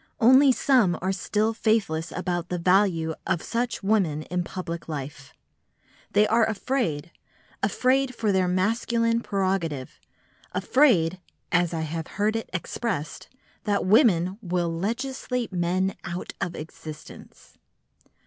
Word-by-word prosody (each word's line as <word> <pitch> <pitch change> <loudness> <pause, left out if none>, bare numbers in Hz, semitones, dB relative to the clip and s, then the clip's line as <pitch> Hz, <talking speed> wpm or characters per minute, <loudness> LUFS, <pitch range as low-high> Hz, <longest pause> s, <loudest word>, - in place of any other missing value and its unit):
Only 260 +4 +7
some 245 -9 +3
are 185 +2 -1
still 210 +3 0
faithless 205 -8 0
about 175 -1 -2
the 180 - -1
value 175 -2 +2
of 175 -3 0
such 240 -2 -2
women 190 -8 +1
in 180 +2 -2
public 170 -2 -6
life. 140 -2 -6 0.8
They 210 - +5
are 225 +2 +3
afraid, 215 - -1 0.5
afraid 260 0 +1
for 215 -3 0
their 190 -1 +2
masculine 230 +5 +1
prerogative, 185 - -2 0.5
afraid 185 - +3 0.3
(as 175 -1 +2
I 165 -2 -2
have 160 +1 -4
heard 210 +2 +1
it 225 - -3
expressed) 185 -3 -4 0.4
that 205 -1 +1
women 190 - +4
"will 175 -3 -1
legislate 240 +4 -3
men 185 +2 0
out 180 -1 -5
of 175 - -2
existence." 155 0 -11
190 Hz, 120 wpm, -25 LUFS, 170-225 Hz, 0.8 s, Only